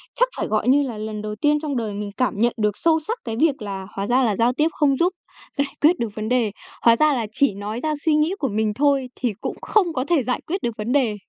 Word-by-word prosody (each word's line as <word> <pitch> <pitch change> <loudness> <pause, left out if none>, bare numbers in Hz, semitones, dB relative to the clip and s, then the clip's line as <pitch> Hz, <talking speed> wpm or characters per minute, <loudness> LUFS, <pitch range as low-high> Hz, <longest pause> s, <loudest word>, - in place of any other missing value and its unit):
chắc - - +3
phải, - - -2
gọi 215 +2 0
như 280 +3 +5
là, 245 -5 -5
lần 215 0 -5
đầu 210 0 -5
tiên 295 +6 +2
trong 295 -3 -3
đời 220 -3 -2
mình 205 0 -5
cảm 255 - +1
nhận 235 +3 +2
được 210 -2 0
sâu 325 -1 +3
sắc 435 +10 -4
cái 225 -2 -4
việc 295 -5 +2
là 195 -2 -5
hóa 195 0 -2
ra 255 +3 +3
là 220 -4 +1
giao 235 +4 +2
tiếp 300 +5 +2
không 280 -4 +2
giúp 355 +4 +2 0.4
giải 280 0 +1
quyết 330 +4 +4
được 235 - -1
vấn 215 0 -3
đề. 245 -4 +2 0.3
Hóa 230 -1 +6
ra 305 +4 +3
là 235 -5 -1
chỉ 280 -1 +2
nói 205 +3 -5
ra 310 -1 0
suy 320 - +4
nghĩ 305 +4 +2
của 275 - 0
mình 215 -1 0
thôi 275 +1 +1
thì 245 -4 -1
cũng - - -3
không 370 -6 +2
có 255 -2 -1
thể 320 -4 +2
giải 250 +1 -2
quyết 375 +4 -2
được 235 -1 -2
vấn 215 +3 -3
đề. 250 -6 +2
250 Hz, 275 wpm, -22 LUFS, 215-300 Hz, 0.4 s, Hóa